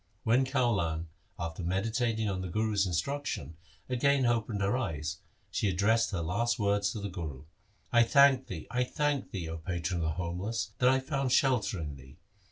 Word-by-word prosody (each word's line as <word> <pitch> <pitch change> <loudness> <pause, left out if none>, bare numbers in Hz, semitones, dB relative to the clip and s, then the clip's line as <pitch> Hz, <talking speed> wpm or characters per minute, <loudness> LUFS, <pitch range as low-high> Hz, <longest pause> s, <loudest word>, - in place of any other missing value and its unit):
When 120 +4 +3
Kaulan, 100 - 0 0.3
after 85 0 -4
meditating 110 +5 0
on 95 -2 -2
the 95 - -4
Guru's 105 +1 +1
instruction, 90 - -2 0.3
again 130 +1 +2
opened 115 -3 0
her 100 +4 +2
eyes, 80 - -2 0.3
she 105 - +1
addressed 110 +5 +2
her 95 -5 -2
last 115 +9 0
words 100 -2 +1
to 110 - -4
the 100 - -3
Guru, 80 -8 -6 0.3
' 100 - -33
I 120 - +7
thank 135 +2 +5
thee! 80 -5 -6
I 125 +1 +2
thank 145 +2 -1
thee! 90 -4 -4
0 80 0 -4
patron 85 +1 -2
of - - 0
the 80 - +1
homeless, 90 +6 -3
that 125 - +5
I 130 0 +4
found 135 -1 -1
shelter 120 -8 +2
in 75 -4 -5
thee. 65 +3 -15
105 Hz, 180 wpm, -30 LUFS, 85-125 Hz, 0.3 s, I